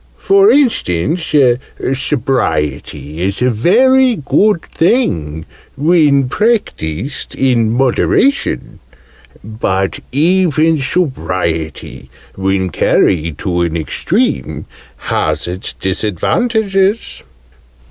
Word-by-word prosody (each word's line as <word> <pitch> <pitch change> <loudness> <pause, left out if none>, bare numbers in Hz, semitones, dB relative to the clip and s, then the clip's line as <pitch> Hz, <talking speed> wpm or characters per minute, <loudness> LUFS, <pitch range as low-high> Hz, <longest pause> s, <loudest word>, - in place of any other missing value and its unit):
"For 395 +1 +4
instance, 165 - 0 0.6
Sobriety 85 - -2
is 95 +2 -2
a 125 0 +2
very 255 - +3
good 175 +4 +1
thing, 80 - -1 0.3
when 145 -3 +3
practised 140 - -2
in 120 -4 +1
moderation: 135 - 0 0.6
but 95 -3 -2
even 160 0 +2
Sobriety, 90 - -3 0.3
when 95 -1 -1
carried 80 0 +1
to 85 -1 -2
an 85 -1 -1
extreme, 70 -4 -2 0.4
has - - -1
its 90 +2 -6
disadvantages." 195 - -1
130 Hz, 75 wpm, -14 LUFS, -, 0.6 s, For